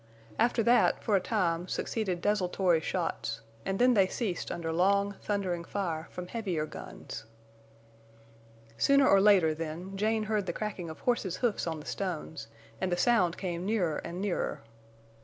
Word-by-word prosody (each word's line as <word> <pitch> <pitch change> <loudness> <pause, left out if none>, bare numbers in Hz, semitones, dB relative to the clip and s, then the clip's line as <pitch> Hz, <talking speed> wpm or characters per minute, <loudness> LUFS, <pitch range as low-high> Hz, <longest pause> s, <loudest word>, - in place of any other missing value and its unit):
After 240 -1 +3
that, 240 +2 +4
for 215 - +2
a - - +5
time, 175 -4 0
succeeded 190 -3 -2
desultory 185 -4 +2
shots; 165 -8 -2 0.3
and 195 - 0
then 250 +2 +5
they 195 -4 +4
ceased 190 -3 -3
under 165 -1 -3
long, 200 +3 +3
thundering 185 -4 -1
fire 170 -4 -3
from 180 - -6
heavier 180 -7 -2
guns. 115 -6 -8 1.5
Sooner 275 -1 +5
or 195 - +6
later, 190 -6 +5
then, 165 +4 -5
Jane 215 +2 +1
heard 215 -2 -1
the - - -1
cracking 195 -5 -4
of 160 - -9
horses' 215 -7 0
hoofs 235 -7 0
on 160 -1 -2
the 150 - -11
stones, 160 - -4 0.3
and 185 - 0
the 175 - +1
sound 180 -4 +3
came 175 -2 -3
nearer 185 -7 0
and 170 +1 -6
nearer. 200 -2 -2
185 Hz, 160 wpm, -30 LUFS, 170-210 Hz, 1.5 s, or